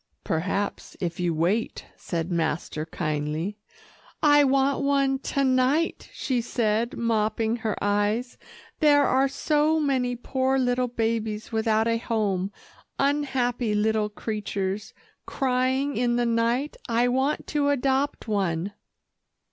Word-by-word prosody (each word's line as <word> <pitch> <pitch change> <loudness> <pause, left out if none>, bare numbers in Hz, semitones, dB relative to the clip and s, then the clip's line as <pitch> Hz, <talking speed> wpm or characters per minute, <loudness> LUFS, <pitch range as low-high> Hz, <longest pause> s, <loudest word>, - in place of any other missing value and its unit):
"Perhaps, 195 +5 -2
if 175 -1 -3
you 175 -1 +1
wait," 175 +8 -1
said 170 0 -4
master 160 -2 -2
kindly. 155 +5 -3 0.6
"I 290 -1 +6
want 275 0 +2
one 275 -1 +2
to 275 0 -1
night," 260 +5 +1
she 255 -4 -1
said 230 0 0
mopping 225 0 0
her 220 -3 -2
eyes. 205 +4 0 0.4
"There 290 -2 +5
are 265 +1 +3
so 300 +3 +1
many 260 -4 0
poor 260 +2 0
little 250 -1 +1
babies 225 -2 -2
without 220 0 +1
a 230 0 +1
home 205 -5 -1 0.5
unhappy 260 -5 0
little 215 0 +1
creatures, 205 -2 -4 0.3
crying 260 +1 0
in 240 0 +1
the 240 0 +1
night. 235 +5 0
I 235 +1 +3
want 265 +4 0
to 290 -1 +1
adopt 275 -1 0
one." 195 -3 -1
235 Hz, 120 wpm, -25 LUFS, 210-265 Hz, 0.6 s, I